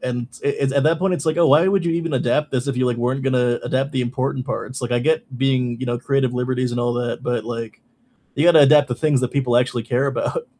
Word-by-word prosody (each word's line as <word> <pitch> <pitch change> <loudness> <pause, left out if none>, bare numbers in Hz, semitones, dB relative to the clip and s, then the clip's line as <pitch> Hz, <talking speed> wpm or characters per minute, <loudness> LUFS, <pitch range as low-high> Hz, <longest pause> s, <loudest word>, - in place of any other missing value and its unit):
And 125 -1 -4
it 140 -1 0
it - - -4
at 140 +1 +1
that 160 +1 +2
point, 190 -1 +1
it's, 170 - -5
like, 155 +1 +1
"Oh, 170 - +4
why 150 +6 +5
would 190 -2 +1
you 170 - 0
even 165 -2 -2
adapt 135 +4 0
this 130 +2 -1
if 135 - -2
you, 125 0 +1
like, 120 -1 0
weren't 125 +3 -1
gonna 125 -2 +1
adapt 135 +2 -1
the 130 - -2
important 130 +1 -3
parts?" 130 0 -5
Like, 120 0 -3
I 120 - +1
get 155 -2 -1
being, 125 -2 0
you 130 - -3
know, 120 0 -2
creative 135 -1 0
liberties, 125 0 -1
and 120 - -3
all 120 0 0
that, 120 -1 -3
but 120 -3 -2
like 115 -1 -6 0.6
you 145 - +1
gotta 170 -3 +7
adapt 145 0 +5
the 120 - -3
things 145 -2 +1
that 125 - +1
people 125 -3 0
actually 120 -2 0
care 125 +4 0
about. 475 - -3
130 Hz, 265 wpm, -20 LUFS, 120-145 Hz, 0.6 s, gotta